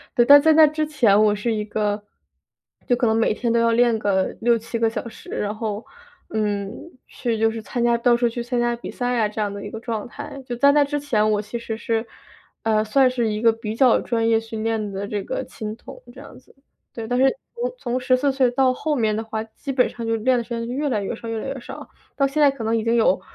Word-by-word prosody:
对。 240 -3 +4
但 285 +2 +9
在 315 +1 +5
那 315 0 +8
之 305 0 -1
前 230 -9 +3
我 210 -1 +3
是 225 +3 -1
一 210 -1 -2
个 210 -1 -1 0.9
就 245 - +3
可 240 - 0
能 220 - +2
每 225 -1 +2
天 235 -2 -1
都 235 - +3
要 230 0 +3
练 235 0 +3
个 190 -3 0
6、7 230 0 0
个 225 - +3
小 225 0 -5
时， - - -14
然 210 +1 -2
后， 215 -1 -4 0.5
嗯， 205 - -2 0.4
去 235 -3 -3
就 225 0 +3
是 225 - -5
参 235 +3 -3
加 235 0 +3
到 240 +1 +3
处 240 -1 +2
去 235 +1 -5
参 245 0 -2
加 240 0 +1
比 235 - -8
赛 245 -1 -1
啊， 215 - +2
这 215 0 -4
样 205 - -1
的 200 0 -7
一 205 - -7
个 225 - -6
状 225 -2 -4
态。 275 - -8
就 240 - -3
在 280 +4 +5
那 290 0 +4
之 290 +1 -2
前， 215 -7 +1
我 210 0 +1
其 215 +3 -6
实 230 -1 -5
是， 225 0 -1 0.6
呃， 215 -1 +2
算 260 +4 +4
是 245 -2 -1
一 210 +1 -3
个 230 - +5
比 220 -1 -5
较 250 0 +4
专 230 -1 0
业 225 - +4
训 225 -1 -6
练 220 -2 -1
的， 200 +1 -4
这 205 -1 -3
个 - - -3
琴 215 0 -7
童 - - -12
这 - - -12
样 - - -13
子。 - - -25 0.4
对， 225 -1 -6
但 245 +2 0
是 265 - +5 0.3
从 - - -3
从 250 - -2
14 255 +2 +2
岁 260 -2 +2
到 255 0 +2
后 300 +3 -2
面 220 -5 +1
的 220 - -2
话， 220 0 -4
基 225 +5 -12
本 255 -2 +2
上 230 -1 -7
就 225 - +1
练 250 +3 +2
的 235 - -1
时 - - -24
间 230 0 -2
越 280 +4 -2
来 215 -5 0
越 195 - -3
少 230 - -9
越 225 0 -3
来 - - -5
越 270 - -5
少， 240 - -10 0.3
到 275 - +2
现 300 +3 -1
在 285 - +7
可 270 -4 -7
能 225 +1 +1
已 220 - -2
经 230 - +2
有， 220 -5 +3
230 Hz, 280 characters per minute, -22 LUFS, 220-250 Hz, 0.9 s, 但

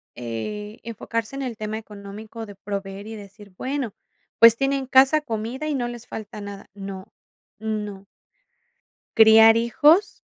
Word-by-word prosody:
eh, 210 - -6
enfocarse 230 +2 -4
en 275 - -4
el 250 -3 -4
tema 215 0 -4
económico 215 +1 -9
de 205 - -11
proveer 200 0 -6
y 220 +1 -7
decir: 205 0 -13
"Bueno, 260 -1 -3 0.5
pues 230 0 +8
tienen 275 0 0
casa, 270 +4 +5
comida 240 +3 -4
y 300 - -1
no 245 -3 -1
les 240 -1 -8
falta 215 -1 -8
nada". 200 -1 -9
No, 195 -1 -8 0.5
no. 210 -2 -4 1.1
Criar 225 0 +8
hijos 295 - +3
220 Hz, 140 wpm, -23 LUFS, 205-240 Hz, 1.1 s, pues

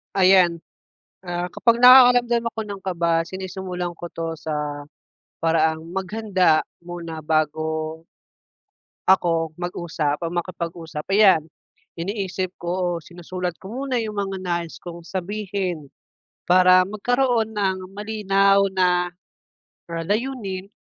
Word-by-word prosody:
Ayan. 185 -3 +5 0.6
Ah, 175 0 -3
kapag 235 +1 +2
nakakaramdam 245 -2 +7
ako 230 -1 -3
ng 200 -2 -7
kaba, 170 -3 0
sinisimulan 185 -1 -5
ko 175 - -6
'to 165 -1 -5
sa, 150 -2 -4 0.5
paraang 160 -1 +2 0.2
maghanda 190 -4 +2 0.2
muna 170 -3 -7
bago 155 +1 -1 1.0
ako 165 -4 +3
mag-usap 165 -4 -2
o 165 - -3
makipag-usap, 170 -3 -5
ayan. 195 -6 +5 0.6
Iniisip 190 -1 -3
ko 175 0 -2
o - - -22
sinusulat 180 0 -5
ko 190 - -10 0.2
muna 255 -3 0
'yong 215 -2 -5
mga 195 -1 -2
nais 170 -2 -3
kong 170 -1 -9
sabihin, 185 -4 -4 0.6
para 185 0 +7
magkaroon 235 +1 +1
ng 190 -3 -1
malinaw 200 -1 +2
na, 180 -1 +2 0.8
ah, 165 0 -3
layunin. 205 -4 -3
180 Hz, 110 wpm, -23 LUFS, 165-200 Hz, 1.0 s, nakakaramdam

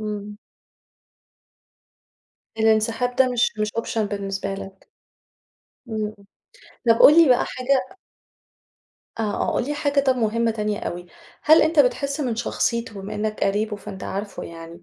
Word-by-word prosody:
إمم. 210 -1 -5 2.2
الانسحاب 225 +3 +1
ده 260 -1 +4
مش 240 -1 +2
مش 215 0 0
Option 230 0 -2
بالنسبة 195 -1 -3
لك. 195 0 -10 1.0
امم، 215 -1 -3 0.7
طب 230 0 +5
قُل 320 +3 +9
لي 315 - +4
بقى 250 0 +4
حاجة 260 +3 -1 1.2
آه، - - 0 0.2
آه - - 0
قُل - - +1
لي - - -7
طب 295 - -1
حاجة 285 -1 +1
مُهمّة 230 -1 0
تانية 210 -1 -2
أوي، 175 -3 -5 0.4
هل 315 +1 +6
أنت 320 -1 +1
بتحِسّ 280 +2 0
من 245 -5 -1
شخصيته 235 -1 -1
بما 195 +2 -7
إنك 215 0 -2
قريبه 210 +2 0
فأنت 200 -2 -9
عارفه 200 +1 -5
يعني 165 +1 -11
220 Hz, 140 wpm, -23 LUFS, 205-250 Hz, 2.2 s, قُل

